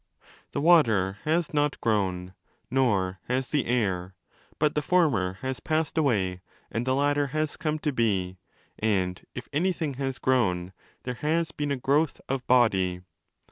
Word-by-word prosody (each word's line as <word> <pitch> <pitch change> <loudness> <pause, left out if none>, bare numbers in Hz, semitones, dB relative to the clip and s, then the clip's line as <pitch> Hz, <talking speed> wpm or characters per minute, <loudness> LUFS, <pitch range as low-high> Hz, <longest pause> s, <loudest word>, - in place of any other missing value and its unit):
The - - -1
water 110 - +4
has 160 +1 0
not 145 -1 +1
grown, 95 -5 -1 0.4
nor 100 -8 +1
has 130 +1 -1
the 145 -3 +1
air: 95 -6 -1 0.4
but 150 0 +2
the 150 - 0
former 145 - +2
has 130 0 -3
passed 155 0 -1
away 100 - +1 0.3
and 120 +3 -2
the 130 - +2
latter 145 +1 +2
has 155 +2 -2
come 155 -3 -2
to 150 -1 -1
be, 95 -6 0 0.4
and—if 100 +3 -2
anything 165 -2 0
has 135 -2 -2
grown—there 100 -1 -1
has 165 +2 +1
been 145 -2 -3
a 140 - 0
growth 140 +4 +1
of 135 -1 -3
'body'. 95 -8 +3
130 Hz, 140 wpm, -27 LUFS, 95-150 Hz, 0.4 s, water